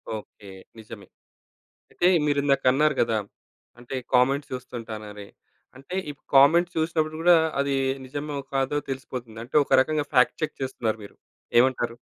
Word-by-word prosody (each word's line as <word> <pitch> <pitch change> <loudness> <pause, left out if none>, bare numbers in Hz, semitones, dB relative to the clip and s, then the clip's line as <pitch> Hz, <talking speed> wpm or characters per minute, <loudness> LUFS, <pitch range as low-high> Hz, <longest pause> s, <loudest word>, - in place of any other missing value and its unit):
Okay. 105 -1 -11 0.3
నిజమే. 105 -3 -11 0.8
అంటే 175 - +1 0.2
మీరిందాక 140 -2 +1
అన్నారు 150 +3 +2
గదా! 115 -2 +1 0.6
అంటే, 120 +2 -7 0.2
కామెంట్స్ 135 +3 +2
చూస్తుంటానని. 110 -5 -8 0.5
అంటే, 135 +7 -8
ఈ - - -2 0.2
కామెంట్స్ 170 +6 +5
చూసినప్పుడు 160 -1 -1
గూడా 175 0 +6 0.2
అది 140 0 0 0.3
నిజమో, 145 +2 -5 0.2
కాదో, 135 +2 0
తెలిసిపోతుంది. 125 -4 -6
అంటే, 125 - -11
ఒక - - -24
రకంగా 150 +1 -1
ఫ్యాక్ట్ 125 -2 +3
చెక్ - - -4
చేస్తున్నారు 120 -4 -2
మీరు 100 - -13 0.4
ఏమంటారు? 120 -2 +1
135 Hz, 130 wpm, -25 LUFS, 120-145 Hz, 0.8 s, గూడా